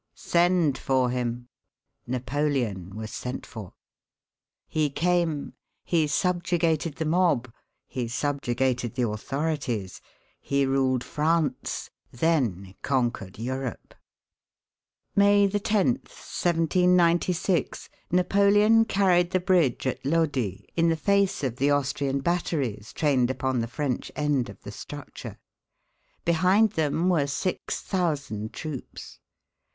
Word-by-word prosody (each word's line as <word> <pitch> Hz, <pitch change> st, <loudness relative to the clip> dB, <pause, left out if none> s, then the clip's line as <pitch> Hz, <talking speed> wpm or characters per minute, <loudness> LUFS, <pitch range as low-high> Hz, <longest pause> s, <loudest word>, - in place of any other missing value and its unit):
"Send 170 Hz, -5 st, +2 dB
for 130 Hz, -2 st, +1 dB
him." 120 Hz, -1 st, -3 dB, 0.6 s
Napoleon 125 Hz, -, -2 dB
was 110 Hz, 0 st, -6 dB
sent 125 Hz, 0 st, -5 dB
for; 105 Hz, -5 st, -9 dB, 0.9 s
he 155 Hz, -2 st, 0 dB
came, 165 Hz, -1 st, 0 dB, 0.3 s
he 160 Hz, -3 st, +1 dB
subjugated 170 Hz, -1 st, 0 dB
the 160 Hz, -, -3 dB
mob, 155 Hz, -8 st, +1 dB, 0.3 s
he 125 Hz, -2 st, -4 dB
subjugated 125 Hz, -2 st, -1 dB
the 125 Hz, -2 st, +1 dB
authorities, 125 Hz, -, -3 dB, 0.4 s
he 140 Hz, 0 st, 0 dB
ruled 130 Hz, -2 st, +1 dB
France, 150 Hz, -3 st, -1 dB, 0.2 s
then 120 Hz, -, 0 dB
conquered 120 Hz, -8 st, -1 dB
Europe. 130 Hz, +2 st, -5 dB, 1.2 s
May 200 Hz, 0 st, +5 dB
10, 205 Hz, 0 st, +1 dB
1796, 175 Hz, +4 st, +1 dB, 0.2 s
Napoleon 200 Hz, +5 st, +4 dB
carried 180 Hz, -4 st, +3 dB
the 185 Hz, 0 st, +1 dB
bridge 175 Hz, -10 st, +2 dB
at 130 Hz, 0 st, -2 dB
Lodi, 135 Hz, -, 0 dB
in 165 Hz, 0 st, +3 dB
the 165 Hz, -, +2 dB
face 200 Hz, 0 st, +1 dB
of 125 Hz, -3 st, -2 dB
the 140 Hz, +3 st, +2 dB
Austrian 140 Hz, -1 st, 0 dB
batteries, 140 Hz, -, -1 dB
trained 135 Hz, -5 st, +2 dB
upon 130 Hz, -1 st, -1 dB
the 115 Hz, -, -1 dB
French 125 Hz, +1 st, -3 dB
end 145 Hz, -4 st, 0 dB
of -, -, -11 dB
the -, -, -7 dB
structure. -, -, -9 dB, 0.9 s
Behind 185 Hz, +6 st, +4 dB
them 160 Hz, -1 st, 0 dB
were 160 Hz, -6 st, +2 dB
six 180 Hz, +6 st, -2 dB
thousand 145 Hz, -, -2 dB
troops. 155 Hz, -5 st, -8 dB
145 Hz, 105 wpm, -26 LUFS, 125-175 Hz, 1.2 s, May